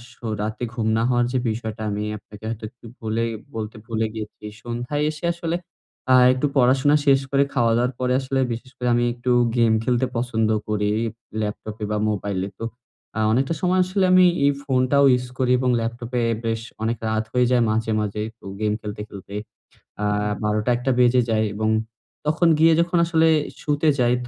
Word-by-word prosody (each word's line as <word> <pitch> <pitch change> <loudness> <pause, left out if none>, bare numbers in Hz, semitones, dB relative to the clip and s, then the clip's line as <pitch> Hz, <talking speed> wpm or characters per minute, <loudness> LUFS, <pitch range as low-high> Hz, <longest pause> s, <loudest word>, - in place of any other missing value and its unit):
So 120 - -8
রাতে 110 +3 -3
ঘুম 115 -3 -2
না 115 - +1
হওয়ার 120 -1 +2
যে, 130 - 0
বিষয়টা 110 0 -4
আমি 105 +1 -2
আপনাকে 105 +1 -15
হয়তো 115 -1 -5
একটু 120 +1 -21 0.2
বলে 110 +1 -1 0.3
বলতে 110 +1 -5
ভুলে 115 -1 -1
গিয়েছি। 105 -1 -8 0.2
সন্ধ্যায় 120 +5 -3
এসে 155 +2 -7
আসলে 170 0 -3 0.6
আ - - +8 0.2
একটু 130 +3 -1
পড়াশোনা 135 +3 +4
শেষ 135 -1 +6
করে, 140 0 +4
খাওয়া-দাওয়ার 120 0 +2
পরে, 125 0 +1
আসলে 135 0 -1
বিশেষ 125 +3 -8
করে 125 - -2
আমি 120 - +2
একটু 125 +1 -2 0.3
গেম 115 -2 +4
খেলতে 125 +1 +1
পছন্দ 115 -2 0 0.2
করি, 105 -1 0 0.5
ল্যাপটপে 105 +1 -5
বা 105 - 0
মোবাইলে। 100 -2 -2
তো 115 - -3 0.5
আ - - 0
অনেকটা 135 +7 +1
সময় 185 +1 +2
আসলে 190 +1 +1
আমি 185 0 +7 0.2
এই 140 - +5
ফোনটাও 135 +1 +3
ইউস 125 0 0
করি 125 -1 +1
এবং 130 0 +1
ল্যাপটপে 120 +2 -3 0.2
বেশ 115 0 -1 0.2
অনেক 115 +1 0
রাত 110 0 0
হয়ে 125 0 +3
যায় 125 -2 +4
মাঝে, 110 +1 0
মাঝে 105 0 -3 0.2
তো - - -17
গেম 105 -1 +1
খেলতে, 105 0 -6
খেলতে। 100 0 -10 0.7
আ - - +1 0.4
১২ঃ০০-১ঃ০০ 120 +5 +1
বেজে 125 0 +5
যায়, 110 -1 +2
এবং 110 +1 0 0.6
তখন 160 +3 +3
গিয়ে 165 +1 +6
যখন 175 +1 0
আসলে 165 -1 +3 0.3
শুতে 150 +1 +1
যাই, 120 -1 +3
120 Hz, 175 wpm, -23 LUFS, 110-130 Hz, 0.7 s, আ